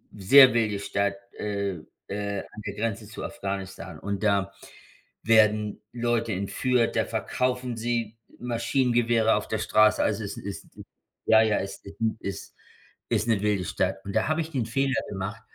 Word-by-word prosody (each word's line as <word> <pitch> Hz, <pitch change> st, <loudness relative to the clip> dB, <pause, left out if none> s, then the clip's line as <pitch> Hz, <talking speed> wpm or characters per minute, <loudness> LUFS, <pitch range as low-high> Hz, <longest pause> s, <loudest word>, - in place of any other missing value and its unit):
sehr 130 Hz, +7 st, +8 dB
wilde 110 Hz, -4 st, +1 dB
Stadt, 100 Hz, 0 st, -1 dB, 0.2 s
äh, 100 Hz, -3 st, -2 dB, 0.3 s
äh, 100 Hz, 0 st, -3 dB
an 105 Hz, -, -11 dB
der 100 Hz, -, -4 dB
Grenze 110 Hz, 0 st, -3 dB
zu 110 Hz, -, -8 dB
Afghanistan 95 Hz, -1 st, -5 dB
und 100 Hz, +1 st, -4 dB
da 100 Hz, -2 st, +1 dB, 0.7 s
werden 105 Hz, -1 st, +3 dB
Leute 120 Hz, -2 st, 0 dB
entführt, 115 Hz, +5 st, 0 dB
da -, -, +2 dB
verkaufen 125 Hz, -1 st, -2 dB
sie 115 Hz, -1 st, -2 dB, 0.2 s
Maschinengewehre 120 Hz, -2 st, +2 dB
auf 105 Hz, -, -2 dB
der 110 Hz, -, -2 dB
Straße, 110 Hz, 0 st, +4 dB
also 110 Hz, 0 st, 0 dB
es 100 Hz, -, -5 dB
ist 100 Hz, 0 st, -7 dB, 0.6 s
ja, 110 Hz, 0 st, +6 dB
ja, 110 Hz, -2 st, +2 dB
es 100 Hz, 0 st, -5 dB
ist 100 Hz, +2 st, -12 dB, 0.2 s
ist 100 Hz, -2 st, -7 dB, 0.5 s
ist 115 Hz, -1 st, +1 dB
'ne 110 Hz, -4 st, +2 dB
wilde 105 Hz, -3 st, 0 dB
Stadt. 95 Hz, +1 st, -1 dB
Und 100 Hz, -, -5 dB
da -, -, +2 dB
habe 155 Hz, +1 st, +1 dB
ich 160 Hz, 0 st, -6 dB
den 130 Hz, -6 st, -1 dB
Fehler 135 Hz, +3 st, 0 dB
gemacht, 100 Hz, +2 st, -5 dB
110 Hz, 160 wpm, -26 LUFS, 100-115 Hz, 0.7 s, sehr